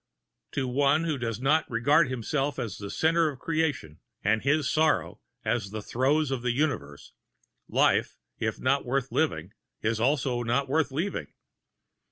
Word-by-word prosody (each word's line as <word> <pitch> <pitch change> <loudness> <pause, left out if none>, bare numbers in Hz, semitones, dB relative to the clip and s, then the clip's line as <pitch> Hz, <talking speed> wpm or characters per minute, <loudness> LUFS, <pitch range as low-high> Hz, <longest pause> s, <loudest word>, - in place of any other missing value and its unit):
To 135 -2 -1
one 140 +5 +2
who 155 -5 -1
does 115 -2 -3
not 150 +5 +2
regard 140 +6 +3
himself 135 +3 -2
as 115 -7 -4
the 100 -1 -6
center 165 +4 +2
of 140 - -7
creation 150 - -2 0.2
and 110 +2 +2
his 145 +1 +2
sorrow 155 - +1 0.2
as 110 -5 0
the 110 0 -6
throes 135 +5 +1
of 130 -3 -1
the 125 0 0
universe, 120 - -2 0.6
life, - - +2 0.2
if - - -2
not 140 +2 +1
worth 135 +1 -1
living, 95 - -1 0.3
is 110 0 0
also 130 -1 +1
not 120 +4 0
worth 145 0 +1
leaving. 170 +9 -2
135 Hz, 155 wpm, -27 LUFS, 115-150 Hz, 0.6 s, regard